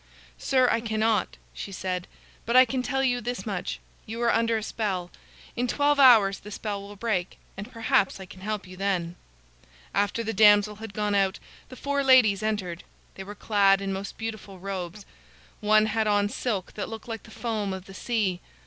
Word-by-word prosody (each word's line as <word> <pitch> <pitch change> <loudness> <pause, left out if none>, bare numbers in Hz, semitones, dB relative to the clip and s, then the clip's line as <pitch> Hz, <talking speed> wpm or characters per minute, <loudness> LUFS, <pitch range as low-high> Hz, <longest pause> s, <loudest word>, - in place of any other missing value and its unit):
"Sir, 260 -2 +3
I 225 - +1
cannot," 220 -1 0 0.2
she 200 - -7
said. 185 -2 -3 0.4
"But 235 - 0
I 255 +1 +9
can 255 +2 -2
tell 270 +1 -1
you 245 -2 +1
this 245 -4 -4
much: 195 -5 -3 0.3
you 225 +2 -6
are 235 - +3
under 230 0 +2
a 215 - -4
spell. 190 -6 -3 0.4
In 245 +1 0
twelve 290 +3 +2
hours 220 -7 +7
the 210 - -11
spell 205 -1 -4
will 200 +1 -10
break, 195 -4 -2 0.2
and 205 +5 -8
perhaps 225 -5 +1
I 190 - -8
can 185 0 -14
help 210 0 -3
you 185 0 -11
then." 180 -3 -1 0.8
After 205 +4 0
the 225 0 -3
damsel 210 0 +5
had 220 -2 -9
gone 210 -1 0
out, 195 -1 +2 0.3
the 255 - -10
four 280 +2 -1
ladies 250 -7 +5
entered. 195 -6 -3 0.3
They 195 - -8
were 205 +2 -9
clad 200 -2 +3
in 195 0 -3
most 195 +1 -6
beautiful 215 -3 -6
robes. 190 +1 -6 0.5
One 215 0 +4
had 220 0 0
on 205 -1 +2
silk 210 -5 -3
that 205 - -5
looked 225 0 -8
like 225 -2 -5
the - - -16
foam 220 -3 -3
of 190 -1 -6
the 195 - -12
sea. 195 -4 -1
210 Hz, 195 wpm, -26 LUFS, 195-230 Hz, 0.8 s, I